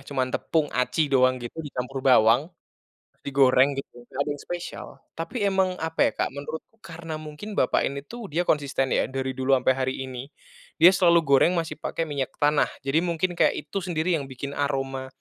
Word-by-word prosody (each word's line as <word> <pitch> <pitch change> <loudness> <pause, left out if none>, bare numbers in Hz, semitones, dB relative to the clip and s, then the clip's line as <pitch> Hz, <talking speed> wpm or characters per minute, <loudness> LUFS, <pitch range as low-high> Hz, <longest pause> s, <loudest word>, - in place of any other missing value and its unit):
Cuma 135 -2 0
tepung 150 +4 -1
aci 125 +5 +1
doang 130 -1 +4
gitu, 120 +5 -7
dicampur 135 -3 -5
bawang, 125 +2 +4 0.7
digoreng, 135 0 +4
gitu. 120 -3 -8
Enggak 125 - -12
ada - - -2
yang 145 - -10
spesial. 175 0 -6 0.3
Tapi 165 +10 -6
emang, 190 -2 +1
apa 160 0 +1
ya, - - -19
Kak. - - 0
Menurut 145 +3 -5 0.2
karena 165 -2 -7
mungkin 155 +7 -7
bapak 130 - +2
ini 140 0 -4
tuh, 235 +6 -9
dia 175 +3 +1
konsisten, 140 -5 0
ya, - - +2
dari 130 0 -3
dulu 130 +1 +1
ampe 130 0 +2
hari 130 0 -2
ini, 130 0 -7 0.5
dia 175 - +8
selalu 170 -3 +4
goreng 140 +4 +4
masih 165 -1 -2
pakai 165 - -3
minyak 140 -4 -3
tanah. 145 0 +4 0.2
Jadi, 135 +3 +1
mungkin 170 +1 0
kayak - - +4
itu - - -4
sendiri, 175 -2 0
yang 140 - -6
bikin 135 +1 -6
aroma, 135 -2 -2
145 Hz, 185 wpm, -25 LUFS, 130-165 Hz, 0.7 s, dia